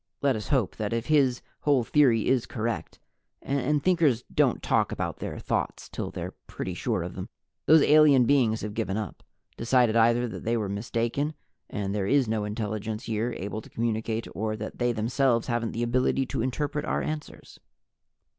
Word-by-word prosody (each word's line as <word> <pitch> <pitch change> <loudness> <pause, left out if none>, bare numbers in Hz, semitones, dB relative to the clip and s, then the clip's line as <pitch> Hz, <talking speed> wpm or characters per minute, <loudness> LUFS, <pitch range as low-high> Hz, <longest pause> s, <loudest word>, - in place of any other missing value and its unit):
Let 140 -3 +3
us 105 - -5
hope 130 -10 0
that 105 0 -2
if 115 0 -1
his 135 -4 +2 0.2
whole 140 -4 +2
theory 120 -4 +3
is 130 -3 +2
correct 115 -1 -4 0.4
and 140 +1 0
Thinkers 160 -10 +3
don't - - +2
talk - - +2
about - - -3
their - - -5
Thoughts - - -2
till - - -5
they're - - -6
pretty - - -5
sure - - -1
of - - -6
them - - -7 0.4
those 160 -1 +7
alien 150 -4 +6
beings 120 -5 +3
have 105 -1 -4
given 105 -2 -2
up, 105 -6 -5 0.4
decided 120 -1 +3
either 120 +1 +4
that 95 -6 -7
they 115 +1 +1
were 105 -3 -2
mistaken 115 +8 -2 0.3
and 100 -1 -3
there 100 -2 -1
is 135 +1 +3
no 110 -1 -1
intelligence 110 +1 -3
here 115 +2 -2
able 100 +4 -4
to - - -15
communicate, 115 0 -2
or 110 +1 -2
that 110 0 -7
they 120 0 +2
themselves 120 +2 +1
haven't 120 -2 -1
the 115 - -2
ability 130 +2 +1
to 125 - -3
interpret 145 +4 -2
our - - -1
answers. 155 -1 -6
115 Hz, 180 wpm, -27 LUFS, 110-135 Hz, 0.4 s, those